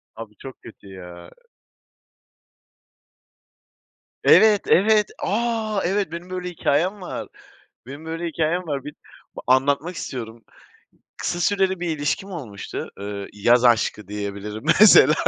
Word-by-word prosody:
Abi 110 -2 -10
çok 135 -1 -11
kötü 105 - -14
ya! 90 -2 -11 2.9
Evet, 215 -2 +6
evet. 210 +2 +3
A, 220 -1 -1
evet 195 -2 -1
benim 170 +2 -8
böyle 180 -1 -4
hikâyem 175 +4 0
var. 180 - -6 0.6
Benim 140 +4 -10
böyle 165 +1 -4
hikâyem 165 +2 -1
var. 140 -3 -3
Bir 150 - -8 0.5
anlatmak 140 +6 +2
istiyorum. 115 -3 -7 0.7
Kısa 175 - -3
süreli 190 -1 +1
bir 165 -3 -2
ilişkim 195 +7 -2
olmuştu. 120 - -7
Eee, 100 0 -6
yaz 120 +4 +3
aşkı 110 -4 +2
diyebilirim 105 +1 -6 0.2
mesela. 155 -8 +8
155 Hz, 115 wpm, -22 LUFS, 110-185 Hz, 2.9 s, mesela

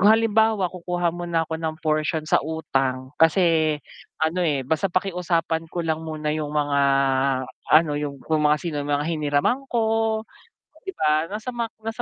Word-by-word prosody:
halimbawa 220 -2 +4
kukuha 175 -1 -2
muna 170 -2 -1
ako 160 - -2
ng 160 -1 -3
portion 155 0 0
sa - - +4
utang, 135 -4 -2
kasi 160 -2 +3 0.4
ano, 170 +3 +1
eh, 145 -4 +1
basta 160 +7 -1
pakiusapan 170 -3 0
ko 175 - -2
lang 160 -1 -2
muna 155 -1 -4
yung 150 -1 -2
mga 145 -1 +1 0.9
ano, 155 -1 +6
yung, 145 -2 -4
yung 155 -1 +2
mga, 150 0 +5
sino 165 -4 -4
yung 145 - -2
mga 145 +1 0
hiniraman 155 - 0
ko, 235 - +2 1.0
'di 385 - -5
ba, 155 +1 +2
nasa 215 +5 -5 0.3
nasa 225 +2 -4
160 Hz, 155 wpm, -23 LUFS, 150-180 Hz, 1.0 s, ano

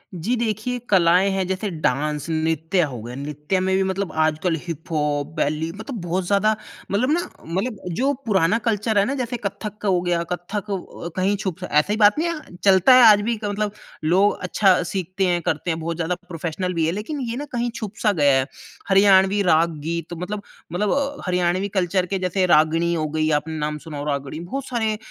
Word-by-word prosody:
जी 190 +9 -1
देखिए, 230 +2 -2
कलाएँ 185 0 +4
हैं 190 -1 0
जैसे 190 +3 -2
डांस 150 +3 0
नृत्य 160 +3 0
हो 135 -8 -3
गया, 120 +1 -7
नृत्य 150 +6 -2
में 190 0 +1
भी 190 - +2
मतलब 190 -2 -2
आजकल 160 +2 +1
हिप-हॉप, 150 -3 -2
बेली 155 +1 -1
मतलब 220 +1 -6
बहुत 175 +2 -2
ज़्यादा 210 +2 +3 0.4
मतलब 240 +8 +1
ना 330 - +3 0.3
मतलब 195 +8 -2 0.2
जो 275 +2 +2
पुराना 195 -2 +3
कल्चर 220 0 +1
है 200 - +3
ना, 265 - -1
जैसे 245 0 -3
कथक 210 +1 -5
हो 185 -3 +2
गया, 175 -1 0
कथक 195 +4 -4
अ, 180 -2 -5
कहीं 190 +2 +1
छुप 185 -4 -4
ऐसी 150 +8 +3
बात 210 +5 +5
नहीं 340 - +1
है, 310 - -7
चलता 195 +5 +6
है 255 - +8
आज 210 -2 +7
भी, 225 +1 -1
मतलब 205 0 -1 0.3
लोग 190 +6 +3
अच्छा 185 0 +3
सीखते 185 +2 -2
हैं, 175 -1 +1
करते 160 +3 -1
हैं 160 - -3
बहुत 165 +1 -3
ज़्यादा 170 +2 -1
प्रोफेशनल 175 +2 -3
भी 165 -2 +1
हैं, 165 - 0
लेकिन 220 +9 -4
ये 230 - -3
ना 290 - -4
कहीं 240 -1 -1
छुप 215 -2 -6
सा 215 - +4
गया 140 -2 +5
है। 130 - +1 0.4
हरियाणवी 195 0 +5
राग-गीत 165 +1 0
मतलब, 200 +4 -4 0.3
मतलब 195 +4 0
अ, 280 +1 0
हरियाणवी 180 +2 +1
कल्चर 180 +1 +1
के 195 - 0
जैसे 185 +1 +1
रागिणी 165 +3 +3
हो 155 -2 -1
गई, 155 +1 0
आपने 160 +1 -7
नाम 150 0 -2
सुना 150 -2 -6
हो, 145 - -4
रागिणी 140 +1 -3
बहुत 265 +11 -5
सारे 220 -3 -1
185 Hz, 195 wpm, -22 LUFS, 160-210 Hz, 0.4 s, है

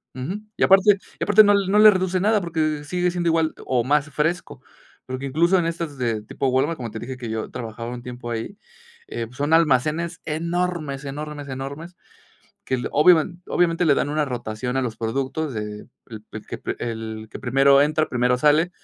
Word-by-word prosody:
ujú. 160 +11 -4 0.2
Y - - +1
aparte 195 +1 +6 0.2
y - - -1
aparte 210 +1 +7
no 205 0 +5
no 200 +1 +2
le 215 0 +10
reduce 185 -1 0
nada, 210 +3 +3
porque 155 -3 -1
sigue 180 +3 0
siendo 175 -1 -2
igual 160 -1 +1
o 125 -2 +1
más 145 +3 +1
fresco. 160 +5 -2 0.5
Porque, 130 +1 -5
incluso, 170 +7 +3
en 170 - 0
estas 165 -3 -4
de 115 -4 -1
tipo 125 +5 -3
Walmart, 135 +6 +1
como 120 -3 -6
te 110 - -6
dije 130 +3 -6
que 120 -2 -6
yo 110 0 -3
trabajaba 115 -1 -6
un 120 -1 -8
tiempo 125 -1 -7
ahí, 115 - -5 0.5
eh, 115 - -4
pues 125 +2 -16
son 145 +3 0
almacenes 160 +2 +2
enormes, 165 -3 -2
enormes, 145 +1 -6
enormes 140 +6 -7 0.7
que - - -4
el 125 - -4
obiamen-obviamente, 175 +1 +3
le 150 - +5
dan 140 - 0
una 150 0 0
rotación 125 0 -4
a - - +1
los 115 -3 -4
productos 135 +6 -2
de 105 -1 -6 0.2
el 110 -2 -10
el 110 - -8
que - - -7 0.2
el 110 -1 -5
que - - -8
primero 135 +2 +4
entra, 155 +2 +1
primero 125 0 +1
sale. 150 +5 +3
145 Hz, 190 wpm, -23 LUFS, 125-170 Hz, 0.7 s, le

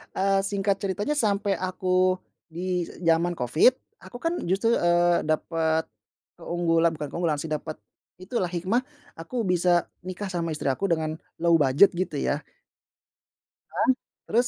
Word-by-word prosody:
eee, 195 0 +2
singkat 200 0 0
ceritanya 200 +9 -2
sampai 200 -5 +1
aku, 185 0 +1 0.3
di 175 +1 -2 0.2
jaman 170 +1 +2
covid, 155 - +4 0.2
aku, 190 +6 -11
kan, 335 +1 0
justru, 200 +6 +2
eee, 175 0 +3
dapat 160 +1 0 0.5
keunggulan, 170 -1 +1
bukan 150 -2 -5
keunggulan, 170 -3 -1
sih, 160 - -5
dapat 155 +1 -3 0.5
itu, 220 +6 -4
lah, 180 - +1
hikmah, 190 +9 0 0.3
aku 165 +10 -4
bisa 180 -2 +2 0.2
nikah 185 +2 -5
sama 170 -3 -2
istri 150 - -2
aku 135 +9 -1
dengan 160 -2 -1 0.2
low 170 -1 +5
budget 145 +6 +5
gitu, 185 - -2
ya. - - -1 1.3
Nah, - - 0 0.4
terus, 240 +3 +2
175 Hz, 140 wpm, -26 LUFS, 165-195 Hz, 1.3 s, low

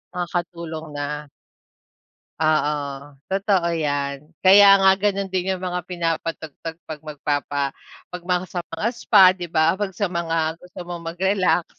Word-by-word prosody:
Makakatulong 170 -2 -4
na 150 +1 -4 1.1
Oo, 155 -1 +2 0.6
totoo 195 -2 +1
'yan. 145 -1 -2
Kaya 195 +1 +8
nga 195 0 +6
ganun 200 0 0
din 190 0 -1
yung 185 -1 -4
mga 180 0 -3
pinapatugtog 165 -2 -4
'pag 155 -2 -7
magpapa 145 -2 -2 0.3
'pag 180 0 -8
mga 180 0 0
sa 175 - -4
mga 165 +7 -1
spa, 205 -4 +5
di 175 -2 -6
ba? 160 +1 +3
'Pag 200 0 -3
sa 200 +2 -1
mga 165 -2 -1
gusto 180 0 -12
mong 175 -1 -6
mag-relax. 185 -1 +1
170 Hz, 135 wpm, -22 LUFS, 155-190 Hz, 1.1 s, Kaya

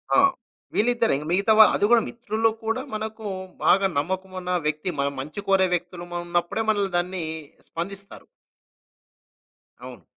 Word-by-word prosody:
ఆ! - - +7 0.6
వీళ్ళిద్దరే. 235 -2 +2
ఇంకా 150 +2 -6
మిగతా 200 +4 +3
వా 220 - +12
అది 205 - +2
గూడా 235 -1 +6
మిత్రుల్లో 225 -1 0
కూడా 225 +4 -1
మనకు 220 0 -5 0.4
బాగా 195 +1 +5
నమ్మకం 185 +5 -2
ఉన్న 180 0 -4 0.2
వ్యక్తి 155 +4 -2
మన 140 - +2
మంచి 150 +8 -6
కోరే 190 -1 +5
వ్యక్తులుం 175 0 -6
ఉన్నప్పుడే 175 +5 -1
మనల్ని 200 -3 +1
దాన్ని 180 0 -2 0.5
స్పందిస్తారు. 195 +4 -6 1.6
అవును. - - -10
195 Hz, 135 wpm, -24 LUFS, 175-220 Hz, 1.6 s, వా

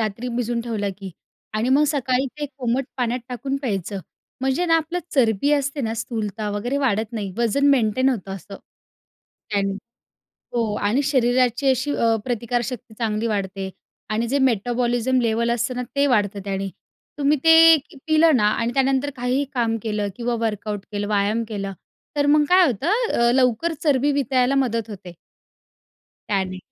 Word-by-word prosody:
रात्री 220 +3 -2
भिजून 240 -1 -1
ठेवलं 220 -4 -2
की 195 -1 -7 0.4
आणि 220 +3 0
मग 280 +3 +4
सकाळी 265 -1 0
ते 295 - -2
कोमट 250 +2 0
पाण्यात 245 -1 -1
टाकून 260 +2 -3
प्यायचं. 200 - -3 0.4
म्हणजे 265 +6 +1
ना, 330 -1 +4
आपलं 325 +2 -2 0.2
चरबी 235 0 +2
असते 285 0 0
ना 225 -2 -2
स्थूलता 215 -2 -3
वगैरे 235 +7 -2
वाढत 225 -4 0
नाही. 205 -4 -4
वजन 235 +4 +2
मेंटेन 255 0 +2
होतं 195 -7 -2
असं 195 +1 -9 0.9
त्यांनी 200 -1 0 0.8
हो 225 -3 0
आणि 245 +7 +2
शरीराची 255 -1 +2
अशी 260 +3 +1
अ, 230 -1 +2
प्रतिकारशक्ती 240 -1 -3
चांगली 225 -1 -1
वाढते 195 -2 -3 0.4
आणि 220 +2 0
जे 275 +4 +1
मेटाबॉलिझम 245 +1 +1
लेवल 230 0 +1
असतं 240 +2 -1
ना 250 - -2
ते 280 0 +3
वाढतं 205 -5 +1
त्याने. 195 0 -2 0.5
तुम्ही 290 +1 +2
ते 325 0 +8 0.3
पिलं 315 0 +5
ना 215 -4 +3
आणि 230 +2 -1
त्यानंतर 270 +1 +1
काहीही 250 +2 0
काम 230 -3 0
केलं 210 -2 -1
किंवा 240 +1 -2
वर्कआउट 210 -2 -3
केलं 205 0 -3
व्यायाम 210 +2 +1
केलं 200 -3 -4 0.4
तर 285 - +2
मग 295 +1 +5
काय 365 0 +6
होतं 265 - -1 0.2
अ, 235 0 +3
लवकर 260 +6 +2
चरबी 290 -2 +3
वितळायला 270 -1 +1
मदत 230 -5 0
होते. 185 -4 -9 1.2
त्याने. 190 -2 -1
240 Hz, 155 wpm, -22 LUFS, 215-270 Hz, 1.2 s, ते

